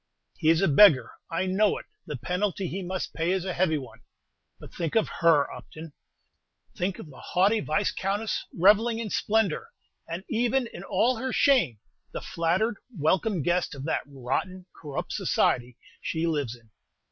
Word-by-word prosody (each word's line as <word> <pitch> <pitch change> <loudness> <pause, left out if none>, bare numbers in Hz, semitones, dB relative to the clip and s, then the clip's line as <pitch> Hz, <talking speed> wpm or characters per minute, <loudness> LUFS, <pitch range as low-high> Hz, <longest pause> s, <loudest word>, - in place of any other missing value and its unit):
"He 155 - +2
is 165 +3 +4
a - - +4
beggar: 150 -2 +6 0.2
I 175 +2 -1
know 195 +3 +2
it; - - -9 0.2
the - - -4
penalty 190 +1 -2
he 190 +4 -4
must 185 0 -4
pay 165 +1 -1
is 185 -1 0
a 185 - -2
heavy 170 -3 +1
one. 130 -4 -9 0.6
But - - -12
think 165 -3 -3
of 225 - +3
her, 165 -4 +5
Upton, 160 -1 -10 0.8
think 185 +1 -2
of 150 - -10
the 130 - -14
haughty 200 +5 +2
Viscountess, 195 +5 -1
revelling 215 +6 +4
in 225 -3 -4
splendor, 215 -6 +1 0.4
and, 170 +3 -5
even 245 +3 +1
in 200 - -9
all 245 +4 +1
her 260 +3 -3
shame, 245 - +3 0.4
the - - -3
flattered, 185 +7 0 0.2
welcomed 175 +3 +1
guest 175 -1 0
of 135 - -7
that 160 - 0
rotten, 145 +7 -3
corrupt 145 -3 -6
society 125 0 +1 0.2
she 165 0 -2
lives 145 -8 -1
in. 115 -2 -22
180 Hz, 165 wpm, -27 LUFS, 155-205 Hz, 0.8 s, beggar